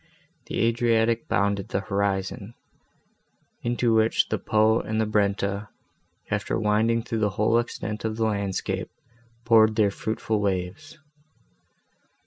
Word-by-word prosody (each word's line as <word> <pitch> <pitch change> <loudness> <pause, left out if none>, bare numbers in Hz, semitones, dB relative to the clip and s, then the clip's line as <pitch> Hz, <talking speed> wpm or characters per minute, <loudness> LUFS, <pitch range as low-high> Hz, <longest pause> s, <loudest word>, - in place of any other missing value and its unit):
The - - -3
Adriatic 115 0 +2
bounded 100 0 0
the 95 - -1
horizon, 100 +2 -2 1.1
into 120 -1 +1
which 110 0 +2
the - - -1
Po 110 +1 +3
and 110 0 -3
the 110 - +2
Brenta, 100 -1 0 0.6
after - - -1
winding 110 +2 +1
through 115 -1 -3
the 105 -1 +2
whole 110 +2 +3
extent 110 -2 -4
of 110 -1 -2
the 115 - +1
landscape, 100 -3 -2 0.6
poured 110 -2 +5
their 105 -3 +3
fruitful 110 +1 -2
waves. 100 - -3
110 Hz, 120 wpm, -25 LUFS, 100-115 Hz, 1.1 s, poured